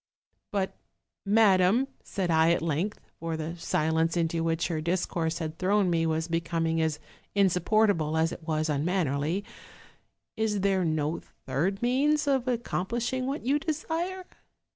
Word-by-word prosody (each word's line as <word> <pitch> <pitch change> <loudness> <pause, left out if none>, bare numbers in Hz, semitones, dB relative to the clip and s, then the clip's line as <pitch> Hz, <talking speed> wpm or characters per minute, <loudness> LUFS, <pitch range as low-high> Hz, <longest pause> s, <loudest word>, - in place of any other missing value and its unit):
" - - -51
'But 195 -2 -1 0.5
madam,' 205 +3 +4 0.2
said 185 -3 -2
I 160 0 +4
at 170 - -1
length 170 +7 -1 0.2
(for 165 -1 -3
the 160 +2 -4
silence 160 +1 +1
intf 165 -1 0
which 165 0 0
her 160 -3 -2
discourse 170 -1 -1
had 160 -1 -5
thrown 195 0 +2
me 165 -1 +2
was 160 0 0
becoming 165 -1 0
as 160 -2 0 0.4
in 200 -1 +5
supportable 180 -3 +2
as 160 +1 +2
it - - -7
was 155 -1 0
unmannerly), 155 +2 0 0.9
'is 215 -2 0
there 195 -1 +2
no 155 0 0 0.3
third 175 - -1
means 290 +5 +2
of 265 -2 +1
accomplishing 240 +2 -1
what 275 -2 -3
you 280 +3 +2
desire?' 330 +4 -3
175 Hz, 145 wpm, -28 LUFS, 160-215 Hz, 0.9 s, in